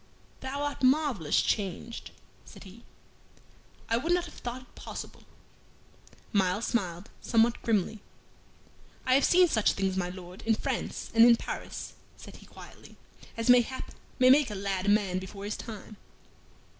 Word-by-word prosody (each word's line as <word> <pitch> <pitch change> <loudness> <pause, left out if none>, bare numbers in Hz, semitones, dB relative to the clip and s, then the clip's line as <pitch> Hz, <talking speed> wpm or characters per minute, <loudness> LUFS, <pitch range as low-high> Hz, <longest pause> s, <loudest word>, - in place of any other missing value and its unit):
"Thou 275 +2 -4
art 290 0 -3
marvellous 260 - +2
changed," 205 +3 -2 0.3
said - - -13
he. 205 +4 -14 1.0
"I 230 - +1
would 315 +8 -1
not 355 0 +2
have - - -11
thought 245 +1 -6
it - - -24
possible." - - -8 1.1
Myles 195 +2 +1
smiled 185 -4 -2
somewhat 230 0 +2
grimly. 220 -2 0 1.0
"I 255 - +3
have 275 - +4
seen 360 0 +6
such 220 -10 +2
things, 190 -1 -1
my 180 -2 -1
Lord, 180 0 -10
in 225 0 +2
France - - -4
and 225 0 +7
in 235 0 +8
Paris," - - -6 0.2
said - - -12
he, - - -16
quietly, - - -14 0.4
"as, 230 - -2
mayhap, 250 +1 +3 0.3
may 255 0 +6
make 280 -1 +5
a 210 - -5
lad 195 -1 -2
a - - +4
man 200 -3 +2
before 195 +2 -8
his 210 - -3
time." 215 -1 -9
225 Hz, 155 wpm, -29 LUFS, 195-255 Hz, 1.1 s, in